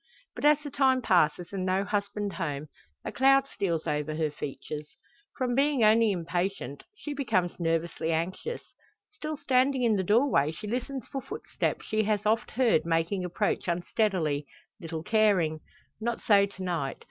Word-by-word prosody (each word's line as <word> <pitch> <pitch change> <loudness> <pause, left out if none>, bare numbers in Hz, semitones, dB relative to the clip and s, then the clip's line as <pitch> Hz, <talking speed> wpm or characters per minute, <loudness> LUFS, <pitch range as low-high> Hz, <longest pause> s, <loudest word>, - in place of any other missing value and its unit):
But - - -4
as 300 0 +7
the 290 - -6
time 260 -2 +3
passes 175 -1 +2
and 190 -2 -2
no 190 +1 +1
husband 205 0 -2
home, 150 -4 -4 0.4
a - - -3
cloud 270 +1 +4
steals 170 - -2
over 150 +1 -1
her 155 -1 0
features. 150 +1 -6 0.5
From 255 -2 0
being 275 -1 +2
only 220 0 +5
impatient, 175 -3 -3 0.2
she 295 - -5
becomes 185 -12 0
nervously 165 0 -1
anxious. 185 - -2 0.5
Still 300 +5 -5
standing 265 -2 +2
in 225 -3 +3
the 190 - 0
door 210 - +3
she 210 - -8
listens 250 +3 -3
for 270 - -4
footsteps - - -3
she 215 0 +1
has 210 -1 0
oft 220 +2 +1
heard 240 -8 +2
making 165 +3 0
approach 180 +1 -1
unsteadily, 170 -4 0 0.3
little 165 -3 -5
caring. 190 -7 +2 0.4
Not 235 +1 -2
so 200 -2 +5
to 190 -1 -9
night. 165 -7 -2
200 Hz, 160 wpm, -28 LUFS, 165-245 Hz, 0.5 s, as